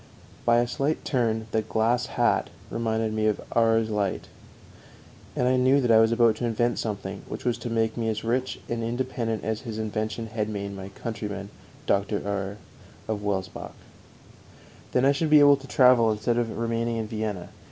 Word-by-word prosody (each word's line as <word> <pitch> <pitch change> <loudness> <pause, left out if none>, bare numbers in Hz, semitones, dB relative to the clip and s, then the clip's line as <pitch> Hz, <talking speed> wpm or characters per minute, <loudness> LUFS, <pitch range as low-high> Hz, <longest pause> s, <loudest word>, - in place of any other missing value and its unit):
By 120 0 +5
a 120 0 +2
slight 140 +5 -1
turn 115 -4 0
the 110 - +1
glass 115 +3 +1
hat 120 - +2 0.2
reminded 110 -1 -1
me 110 0 +1
of 105 - +1 0.2
Auer's 115 -1 +3
light, 100 -2 -2 1.1
and 125 - +1
I 130 0 +3
knew 130 +2 +4
that 125 -3 +2
I 110 - +7
was 110 0 +4
about 115 -1 +4
to 120 - -2
invent 120 +1 0
something 105 -3 -4
which - - -7
was 120 -2 +2
to 120 - -5
make 115 -1 0
me 115 -1 0
as 110 0 -3
rich 125 +3 -1
and 115 -1 -2
independent 115 -2 -2
as 110 0 -2
his 115 -4 -6
invention 110 +1 -3
had 105 -1 -1
made 100 -1 -4
my 95 0 -7
countryman, 105 -3 -6 0.3
Dr. 100 +1 +1
Auer, 100 0 -3 0.5
of 110 -2 -2
Welsbach; 95 -2 -3 1.2
then 125 +1 +2
I 140 - +6
should 150 +3 0
be 150 0 +8
able 145 -1 +7
to 135 0 -12
travel 125 -4 +5
instead 115 +3 0
of 115 -2 -2
remaining 115 0 -1
in 110 - -2
Vienna. 105 -4 -4
115 Hz, 185 wpm, -26 LUFS, 110-120 Hz, 1.2 s, be